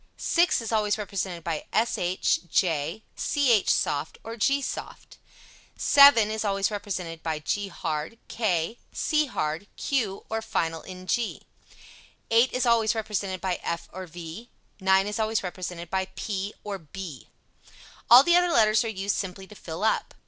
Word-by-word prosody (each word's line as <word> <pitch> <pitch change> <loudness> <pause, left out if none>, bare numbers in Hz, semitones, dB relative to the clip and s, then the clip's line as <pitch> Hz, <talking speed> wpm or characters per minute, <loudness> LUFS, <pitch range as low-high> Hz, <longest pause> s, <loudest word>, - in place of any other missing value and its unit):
6 345 -5 +2
is 230 - -5
always 210 -2 +1
represented 190 -4 -4
by 160 -2 -3
sh, 185 -5 +1
j, 165 +3 0
ch 250 -8 +2
soft 145 +2 0
or 225 +1 -6
g 275 +5 +2
soft. 275 - -7 0.6
7 280 -7 +7
is 220 0 -2
always 195 0 0
represented 180 -5 -4
by 160 -2 -2
g 200 +6 -2
hard, 160 +2 -4
k, 205 -1 -1
c 305 -2 +1
hard, 160 - -3
q 225 -9 -1
or 225 0 -2
final 165 -6 -2
ng. 185 0 -9
8 235 +4 -1 1.1
is 255 0 0
always 230 -1 +3
represented 200 -4 -3
by 185 -2 -1
f 170 0 -3
or 185 0 -7
v. 175 +7 -9 0.3
9 190 0 +4
is 210 +2 -3
always 220 -1 0
represented 180 -2 -6
by 190 0 0
p 200 -1 -3
or 205 -2 -5
b. 160 - -9 0.8
All 245 +3 +10
the 345 +3 +4
other 355 0 +4
letters 215 -4 +4
are - - -3
used 200 -2 -2
simply 190 -1 -5
to 210 - -14
fill 170 -2 -7
up. 220 - 0
200 Hz, 155 wpm, -26 LUFS, 175-225 Hz, 1.1 s, All